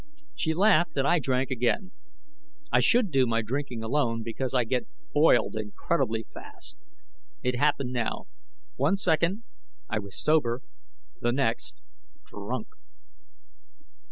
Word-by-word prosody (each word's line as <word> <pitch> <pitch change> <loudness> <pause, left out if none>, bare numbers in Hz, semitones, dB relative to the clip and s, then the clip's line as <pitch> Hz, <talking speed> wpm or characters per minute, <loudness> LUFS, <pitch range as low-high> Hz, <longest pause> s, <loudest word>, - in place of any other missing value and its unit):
She 160 -1 -1
laughed, 180 -4 +4
and 135 0 +2
I 175 +4 +4
drank 130 -2 0
again. 125 - 0 0.8
I - - +5
should 235 -6 +4
do 135 -2 +3
my 115 0 +1
drinking 125 0 -3
alone 115 -2 0
because 120 +3 -3
I 125 -2 +3
get 125 +2 -1 0.3
boiled 150 -5 +4
incredibly 110 +2 -1
fast. 370 - -8 0.7
It 125 - +1
happened 140 -3 +2
now. 120 -2 -2 0.5
One 195 - +2
second 180 +3 +1 0.4
I - - -1
was 100 -2 -7
sober; 130 -6 +2 0.6
the 120 - +2
next, 135 +3 -1 0.4
drunk. - - -5
135 Hz, 125 wpm, -27 LUFS, 115-165 Hz, 0.8 s, I